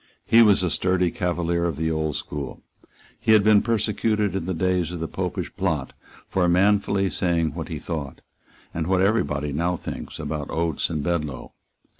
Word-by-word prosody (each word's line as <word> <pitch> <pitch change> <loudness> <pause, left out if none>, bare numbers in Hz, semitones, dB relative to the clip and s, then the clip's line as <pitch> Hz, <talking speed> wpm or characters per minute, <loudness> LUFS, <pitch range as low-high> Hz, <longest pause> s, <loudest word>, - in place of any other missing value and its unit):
He 115 - +6
was 105 -4 +5
a 90 - 0
sturdy 90 -1 +1
Cavalier 85 -1 -1
of 85 -3 0
the 80 +2 -1
old 80 -2 -1
school. 70 -3 -6 0.6
He 110 -1 +3
had 105 -2 +6
been 105 -1 +6
persecuted 105 -3 0
in 90 -3 -3
the 95 - -1
days 90 -1 +1
of 90 -1 -5
the 80 - -3
Popish - - -4
plot - - -1 0.3
for 90 -2 +1
manfully 100 +1 +3
saying 85 -3 0
what 80 -1 -5
he 80 - -5
thought, 75 -3 -5 0.5
and 80 -1 -2
what 95 0 +2
every 110 +4 +3
body 75 0 -3
now 85 +4 0
thinks, - - -7
about 75 -2 -4
Oates 80 -2 -1
and 75 -3 -2
Bedloe. 75 -6 -3
85 Hz, 180 wpm, -24 LUFS, 80-95 Hz, 0.6 s, He